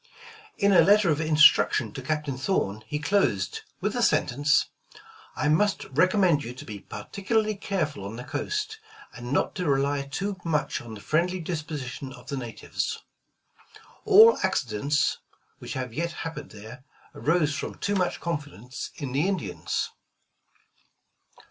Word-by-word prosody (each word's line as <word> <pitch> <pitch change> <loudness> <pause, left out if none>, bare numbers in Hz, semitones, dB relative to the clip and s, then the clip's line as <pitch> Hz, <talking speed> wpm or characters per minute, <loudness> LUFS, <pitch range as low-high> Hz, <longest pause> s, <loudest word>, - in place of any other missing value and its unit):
' 450 -2 -16
' - - -22
In 200 0 +3
a 185 - +7
letter 205 -3 +5
of 150 +1 0
instruction 155 -1 +5
to 135 - -6
Captain 150 0 -2
Thorn, 115 - -1
he 150 - -2
closed 150 - 0 0.2
with - - 0
the - - -1
sentence: 145 +3 +3 0.3
' - - -19
' - - -24
I 150 - 0
must 195 +7 +2
recommend 180 0 +3
you 120 +2 -7
to - - -10
be 105 -2 -7
particularly 210 - -2
careful 185 - -3
on 100 +3 -6
the 125 - -7
coast, 420 - -3 0.3
and 120 +1 -7
not 145 - +1
to 180 -5 -1
rely 140 +1 +1
too 195 +7 -3
much 155 -3 -1
on 115 -2 -9
the 100 - -10
friendly 175 - 0
disposition 150 -6 -5
of 125 0 -13
the 140 - -3
natives. 120 -3 -4 1.1
All 440 +2 +8
accidents 135 +5 0 0.4
which - - -6
have 125 -3 -4
yet 170 +6 -2
happened 160 -3 -6
there, 110 +5 -11 0.3
arose 155 -2 +1
from - - -4
too 205 - -2
much 185 -3 0
confidence 145 -7 -5
in 140 -4 -5
the 145 +7 +1
Indians. 155 - -2
150 Hz, 155 wpm, -26 LUFS, 130-185 Hz, 1.1 s, All